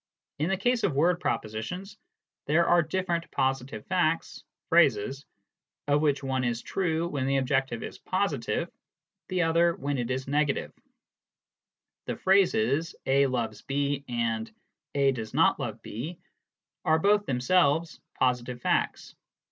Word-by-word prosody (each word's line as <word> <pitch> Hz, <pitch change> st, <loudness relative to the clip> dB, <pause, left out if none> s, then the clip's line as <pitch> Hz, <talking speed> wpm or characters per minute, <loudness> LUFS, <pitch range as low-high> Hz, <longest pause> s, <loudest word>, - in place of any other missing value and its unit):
In 155 Hz, +4 st, 0 dB
the 195 Hz, -, +1 dB
case 245 Hz, +4 st, +1 dB
of 160 Hz, -, +1 dB
word 170 Hz, +5 st, +3 dB
propositions, 180 Hz, -, -3 dB, 0.5 s
there 165 Hz, +4 st, +4 dB
are 175 Hz, 0 st, +5 dB
different 170 Hz, +1 st, -2 dB
positive 130 Hz, -4 st, -2 dB
facts 175 Hz, -3 st, 0 dB, 0.3 s
(phrases), 135 Hz, -5 st, +3 dB, 0.6 s
of 145 Hz, 0 st, +3 dB
which 145 Hz, -2 st, +1 dB
one 130 Hz, -1 st, -1 dB
is 120 Hz, -1 st, -1 dB
true 170 Hz, -3 st, -1 dB
when 140 Hz, -5 st, -2 dB
the 135 Hz, 0 st, +2 dB
objective 130 Hz, -2 st, 0 dB
is -, -, -8 dB
positive, 175 Hz, -11 st, -1 dB, 0.6 s
the 185 Hz, -1 st, +1 dB
other 165 Hz, +1 st, +3 dB
when 140 Hz, 0 st, -2 dB
it 120 Hz, 0 st, -2 dB
is 130 Hz, +1 st, -2 dB
negative: 145 Hz, 0 st, 0 dB, 1.3 s
the -, -, -2 dB
phrases 165 Hz, -, +2 dB
" -, -, -56 dB
A 140 Hz, +1 st, +4 dB
loves 115 Hz, -4 st, -2 dB
B 140 Hz, 0 st, -1 dB
" -, -, -44 dB, 0.2 s
and 110 Hz, -1 st, -3 dB, 0.2 s
" 155 Hz, -2 st, -48 dB
A 140 Hz, -1 st, +4 dB
does 115 Hz, -4 st, -6 dB
not -, -, +4 dB
love -, -, -4 dB
B" 150 Hz, +11 st, -6 dB, 0.7 s
are 160 Hz, -, +3 dB
both 205 Hz, +4 st, +3 dB
themselves 150 Hz, +4 st, +2 dB, 0.2 s
positive 125 Hz, -1 st, 0 dB
facts. -, -, -1 dB
145 Hz, 145 wpm, -28 LUFS, 130-170 Hz, 1.3 s, are